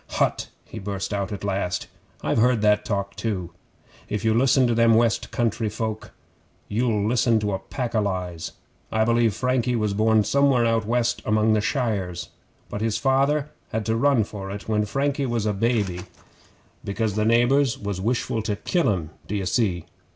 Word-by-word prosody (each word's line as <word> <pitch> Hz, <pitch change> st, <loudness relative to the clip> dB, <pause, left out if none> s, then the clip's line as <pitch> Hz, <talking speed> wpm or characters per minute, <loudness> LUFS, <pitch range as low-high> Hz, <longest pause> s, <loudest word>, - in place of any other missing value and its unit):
'Hutt!' -, -, 0 dB, 0.2 s
he 110 Hz, -, -8 dB
burst 100 Hz, 0 st, -4 dB
out 100 Hz, -1 st, -2 dB
at 100 Hz, -2 st, -6 dB
last, 95 Hz, -3 st, -1 dB, 0.4 s
'I've -, -, +1 dB
heard 120 Hz, -1 st, +3 dB
that 105 Hz, 0 st, +4 dB
talk 100 Hz, -2 st, -3 dB
too. 95 Hz, -6 st, -3 dB, 0.6 s
If 105 Hz, +1 st, -2 dB
you 110 Hz, -, +4 dB
listen 130 Hz, +2 st, +4 dB
to 120 Hz, -, +2 dB
them 115 Hz, 0 st, +4 dB
West 115 Hz, 0 st, +2 dB
Country 115 Hz, -2 st, 0 dB
folk, 110 Hz, 0 st, -4 dB, 0.6 s
you'll 105 Hz, -2 st, 0 dB
listen 120 Hz, -1 st, +3 dB
to 105 Hz, -1 st, -1 dB
a 95 Hz, -, -1 dB
pack 125 Hz, +4 st, -4 dB
o' 110 Hz, -, +2 dB
lies. 90 Hz, -4 st, -3 dB, 0.4 s
I 110 Hz, 0 st, +2 dB
believe 115 Hz, -3 st, +2 dB
Frankie 125 Hz, -1 st, 0 dB
was 105 Hz, -3 st, 0 dB
born 110 Hz, +1 st, +3 dB
somewhere 135 Hz, -1 st, +3 dB
out 115 Hz, -2 st, +1 dB
west 120 Hz, +1 st, +1 dB
among 110 Hz, +1 st, +2 dB
the 105 Hz, -, +2 dB
Shires, 105 Hz, -, -2 dB, 0.4 s
but 105 Hz, -, -5 dB
his 110 Hz, -1 st, 0 dB
father 140 Hz, +2 st, +1 dB, 0.2 s
had 110 Hz, -1 st, -2 dB
to 110 Hz, -, +1 dB
run 130 Hz, -1 st, +3 dB
for 100 Hz, -2 st, -7 dB
it 100 Hz, +1 st, -7 dB
when 105 Hz, -1 st, +1 dB
Frankie 140 Hz, +4 st, -1 dB
was 120 Hz, -3 st, -1 dB
a 105 Hz, -, +1 dB
baby, 100 Hz, -4 st, 0 dB, 0.8 s
because 105 Hz, +1 st, -1 dB
the 105 Hz, +1 st, 0 dB
neighbours 120 Hz, +4 st, +3 dB
was 100 Hz, -2 st, -4 dB
wishful 115 Hz, +1 st, -1 dB
to 105 Hz, -1 st, -2 dB
kill 170 Hz, -, +1 dB
him, 85 Hz, -5 st, -3 dB, 0.2 s
d'ye 100 Hz, -1 st, -2 dB
see? 90 Hz, -4 st, 0 dB
110 Hz, 180 wpm, -24 LUFS, 100-120 Hz, 0.8 s, that